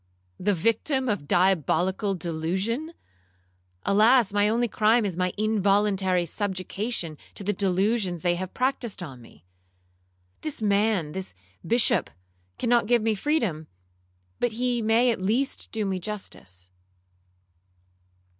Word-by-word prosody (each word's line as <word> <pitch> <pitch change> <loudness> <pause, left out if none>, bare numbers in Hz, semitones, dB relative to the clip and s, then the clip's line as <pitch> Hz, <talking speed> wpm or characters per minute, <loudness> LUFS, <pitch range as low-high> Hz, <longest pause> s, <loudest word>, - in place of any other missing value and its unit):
—the 205 +1 +1
victim 240 - +1
of 205 -11 -2
diabolical 190 - +2
delusion!—Alas! 170 - -1
my 205 0 +3
only 235 +2 +1
crime 220 +1 +3
is 190 -4 -2
my 180 0 0
involuntary 200 -3 +2
subjection 190 -2 -3 0.2
to - - -7
the 205 +2 0
delusions 190 -1 0
they 175 -1 +3
have 185 +1 -4
practised 250 -6 -2
on 130 -7 -9
me. 90 -8 -18 1.0
This 310 - -5
man, 205 -6 +1
this 190 - -5 0.3
Bishop, 235 +6 +2 0.5
cannot 235 -2 +2
give 240 -1 +3
me 225 0 +2
freedom, 210 - -1 0.7
but 245 -2 0
he 245 +1 0
may 225 +3 +3
at 220 - -3
least 235 +8 -1
do 220 -2 -2
me 190 -1 -1
justice.' 95 - -7
200 Hz, 115 wpm, -26 LUFS, 175-225 Hz, 1.0 s, my